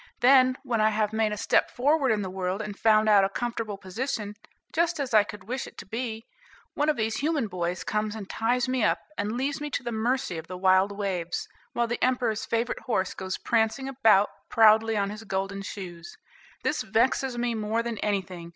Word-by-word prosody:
Then, 255 0 +6
when 240 -5 0
I 215 - +5
have 215 0 0
made 220 -1 +1
a 210 - -3
step - - +2
forward 275 +1 +2
in 210 -2 +1
the 190 - -4
world, 185 +1 -2
and 210 -2 -5
found 215 0 +4
out 205 -2 +6
a 195 - +2
comfortable 230 -1 -3
position, 210 +2 -4 0.4
just 335 0 +1
as 265 -4 -3
I 215 -1 +7
could 210 0 -10
wish 250 +4 -4
it - - -14
to - - -8
be, 225 +1 -4 0.5
one 295 +1 +1
of 300 - +1
these 220 0 -1
human 300 -3 0
boys 180 -3 -3
comes 215 0 -2
and 205 -3 -7
ties 240 +4 0
me 255 -2 0
up, 210 - +3 0.2
and 210 +3 -2
leaves 275 +2 -2
me 295 - -3
to 260 - -3
the 240 - -3
mercy 225 -5 -1
of 160 - -10
the 185 - -6
wild 190 +1 +4
waves, 190 -4 -3 0.3
while 235 - +1
the 240 +1 -3
emperor's 245 -4 +1
favorite 230 +1 -1
horse 190 -7 -1
goes 190 -1 -4
prancing 230 +4 0
about 220 -7 +4 0.2
proudly 220 -1 +5
on 200 0 0
his 215 +1 -8
golden 195 -1 -3
shoes. 180 -4 -8 0.5
This - - 0
vexes 265 -3 +1
me 240 0 0
more 220 +1 -1
than 230 -3 -4
anything. 185 -4 -3
220 Hz, 205 wpm, -27 LUFS, 200-245 Hz, 0.5 s, I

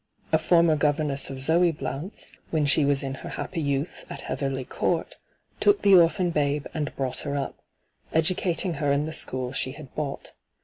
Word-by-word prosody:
A 160 - +4
former 165 0 +4
governess 145 -1 0
of 135 -1 -6
Zoe 165 +5 +4
Blount's, 145 +5 -5 0.2
when 155 -2 +1
she 145 +2 +4
was 140 0 +2
in 135 -1 -3
her - - -6
happy 170 -3 -4
youth 140 +2 -2
at - - -7
Heatherly 135 -2 -3
Court, - - -1 0.4
took 410 0 +3
the 200 - +6
orphan 175 0 +5
babe 145 -2 0
and 150 -2 -3
brought 130 -2 -2
her 140 0 -3
up, 140 -2 -3 0.5
educating 170 +1 +1
her 145 -1 +2
in 140 +1 +2
the 160 - -5
school 130 -4 -1
she 130 -1 -1
had 150 -3 -12
bought. 145 -2 -4
150 Hz, 180 wpm, -26 LUFS, 140-165 Hz, 0.5 s, the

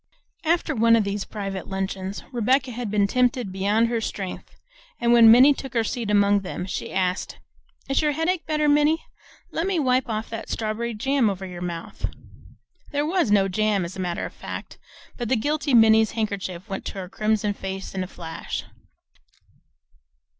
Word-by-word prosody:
After 330 -1 +1
one 230 -2 +5
of 225 - +3
these 200 0 -3
private 195 -3 -5
luncheons 190 0 -4
Rebecca 255 +2 +1
had 240 -2 -4
been 205 -1 +2
tempted 245 -1 +1
beyond 205 +4 +2
her 230 -1 -1
strength, 195 -4 -5 0.4
and 235 0 +3
when 230 -1 +8
Minnie 255 +5 +8
took 270 -2 -8
her 230 - +3
seat 225 0 -3
among 205 0 +4
them 185 -1 -5 0.3
asked, 185 0 -1 0.5
"Is 275 - +2
your 300 -1 +1
headache 325 +3 -1
better, 305 -1 +1
Minnie? 295 +2 +3 0.5
Let 330 +3 -1
me 390 -2 0
wipe 255 -4 +1
off 215 0 -2
that 225 0 -6
strawberry 225 +1 -2
jam 265 +1 +2
over 195 -1 -4
your 180 -2 -8
mouth." 170 -2 -5 0.8
There 290 +1 0
was 335 - +1
no 200 -2 +4
jam 210 +1 +1
there - - -2
as 170 - -7
a - - -8
matter 175 -2 -2
of - - -8
fact, - - -8 0.4
but 240 -3 -3
the 260 - +3
guilty 290 +3 0
Minnie's 220 -1 +6
handkerchief 200 -4 -3
went 195 -2 -5
to - - -4
her 190 -2 -5
crimson 215 +1 0
face 195 -1 -6
in 190 -1 -2
a - - -6
flash. 165 -3 -6
220 Hz, 175 wpm, -24 LUFS, 195-255 Hz, 0.8 s, when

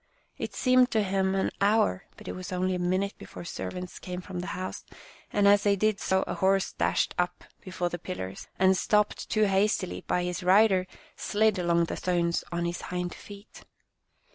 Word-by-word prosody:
It - - -4
seemed 255 -1 +4
to 220 -1 +2
him 190 0 0
an 190 - 0
hour, 200 - +2
but - - -12
it - - -3
was 185 0 -7
only 185 +1 0
a 180 - -2
minute 185 +3 0
before - - -9
servants 180 0 -6
came 180 -1 -6
from 185 -1 -6
the 180 - -5
house, 185 0 -5 0.5
and 205 -1 +3
as 200 0 +6
they 205 -1 +3
did 215 +1 +1
so 190 0 +1
a - - -4
horse 195 0 +1
dashed - - +1
up - - -1 0.2
before 185 -2 -2
the 175 - -5
pillars, 95 - -6
and, 190 0 +4
stopped 210 +3 +1
too 215 - +2
hastily 195 -1 +1
by 180 - +1
his 180 0 -3
rider, 190 0 +4 0.3
slid 215 -2 +1
along 170 -1 +2
the 165 - -3
stones 170 -2 0
on 170 0 -1
his 170 0 -3
hind 180 -1 -4
feet. 205 +1 -12
185 Hz, 190 wpm, -28 LUFS, 180-200 Hz, 0.5 s, as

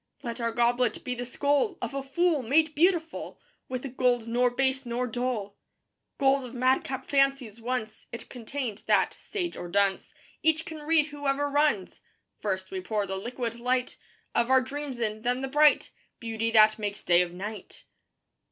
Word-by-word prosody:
Let 235 -1 -4
our 230 0 0
goblet 240 +1 +1
be 250 - -2
the 245 0 -5
skull 285 - +1
Of - - -4
a 275 - -2
fool; 305 +3 +1
made 300 +6 +2
beautiful 330 0 0 0.3
With 255 +1 -4
a - - -1
gold 245 -2 +1
nor 245 +2 +3
base 265 +2 0
nor 245 0 -2
dull: 240 -4 -3 0.6
Gold 270 -1 +3
of 250 0 -9
madcap 260 +1 +1
fancies, 275 -5 +1
once 225 -3 -4
It 235 - -7
contained, 245 -2 -5
that, - - +3
sage 360 -5 -4
or 175 - -6
dunce, 200 +1 +1 0.3
Each 315 0 +2
can 315 -1 -7
read 305 0 +2
whoever 290 -1 -1
runs. 290 -10 +1 0.4
First 190 -2 -3
we 190 -1 -3
pour 210 +2 -1
the 190 0 -4
liquid 235 +3 -4
light 250 +1 0 0.4
Of 235 +1 +1
our 260 0 +6
dreams 275 0 -5
in; 215 -1 -2
then 245 +2 0
the 270 - -2
bright 295 +2 +4 0.3
Beauty 225 -1 -2
that 215 -1 +5
makes 205 -1 -4
day 175 0 +5
of 175 -1 -1
night. 205 +4 -8
250 Hz, 170 wpm, -28 LUFS, 225-275 Hz, 0.6 s, our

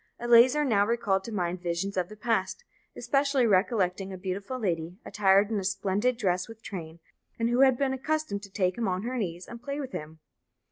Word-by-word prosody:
Eleazar 240 +5 +5
now 210 -6 +3
recalled 205 -3 0
to 230 - -6
mind 180 -3 -2
visions 175 +3 -2
of 180 -1 -1
the 215 - -10
past, 220 - -1 0.3
especially 275 -2 +1
recollecting 195 -2 +1
a 190 - -6
beautiful 195 +6 -4
lady, 175 -5 -2
attired 200 +1 +3
in 215 - 0
a - - -4
splendid 195 +5 0
dress 180 -5 0
with 225 0 -13
train, 170 -4 -7 0.4
and 230 +1 0
who 245 - +1
had 265 -2 +5
been 270 -1 0
accustomed 270 -6 -2
to 200 - -11
take 185 0 0
him 230 - 0
on 185 +1 -1
her 250 +2 -3
knees 175 -3 -4
and 235 0 -9
play 280 +3 -4
with 270 -3 -5
him. 155 +1 -7
205 Hz, 200 wpm, -28 LUFS, 185-240 Hz, 0.4 s, Eleazar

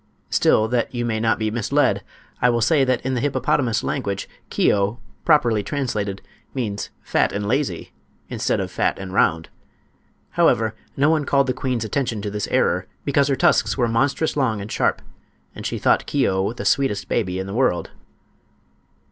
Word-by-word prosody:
Still, 110 - +3
that 125 +1 -1
you 120 0 -1
may 110 -2 -1
not 115 0 +2
be 110 -1 -1
misled, 115 -1 +1 0.4
I 125 - +5
will 120 -1 +2
say 140 +4 +4
that 130 -2 0
in 130 - 0
the 125 - -1
hippopotamus 130 -3 +1
language 100 -8 -2 0.2
"Keo," 100 +4 +1 0.3
properly 120 -9 +4
translated, 105 -6 -3 0.3
means 105 -6 -3
"fat - - +1
and 100 0 -3
lazy" 125 - -1 0.3
instead - - -1
of - - -3
fat - - 0
and 95 -1 -7
round. 80 -4 +2 0.8
However, 110 -1 +2 0.2
no 145 +3 +4
one 155 -2 +2
called 140 0 +2
the 130 - 0
queen's 125 -4 -2
attention 120 -1 -1
to 105 - -3
this 105 0 -3
error, - - +1 0.2
because 140 0 +2
her 140 - +2
tusks - - +2
were 120 -2 +2
monstrous 135 +7 +1
long 125 -7 +1
and 100 +2 -7
sharp, - - 0 0.5
and - - -5
she - - -3
thought - - +2
Keo 95 +2 +1
the 120 - -7
sweetest 135 -8 +1
baby 95 -5 -1
in 95 - -3
the 95 - -6
world. 120 -7 +1
115 Hz, 175 wpm, -22 LUFS, 105-135 Hz, 0.8 s, I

